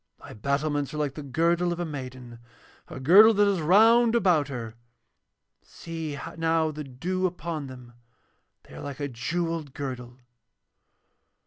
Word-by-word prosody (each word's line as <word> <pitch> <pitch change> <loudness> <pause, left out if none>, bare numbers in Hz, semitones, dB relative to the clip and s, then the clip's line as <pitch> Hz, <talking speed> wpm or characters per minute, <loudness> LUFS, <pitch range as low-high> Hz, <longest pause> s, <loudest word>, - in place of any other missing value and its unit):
Thy - - -11
battlements 140 +5 -2
are - - -4
like 145 -3 -1
the 150 - -7
girdle 170 +5 +1
of 175 - -4
a 175 - -1
maiden, 130 -5 -8 0.5
a - - -8
girdle 200 +11 +7
that 205 0 +4
is 195 -4 +1
round 225 +7 +5
about 175 -10 +3
her. 120 -5 -6 0.9
See 160 -3 -7 0.2
now 165 -1 +1
the 150 0 -6
dew 175 +8 -2
upon 165 -4 -5
them, 125 -2 -12 0.7
they - - -17
are - - -9
like 140 -1 -7
a 145 - -2
jewelled 160 +3 -3
girdle. 125 -3 -6
155 Hz, 145 wpm, -26 LUFS, 135-175 Hz, 0.9 s, girdle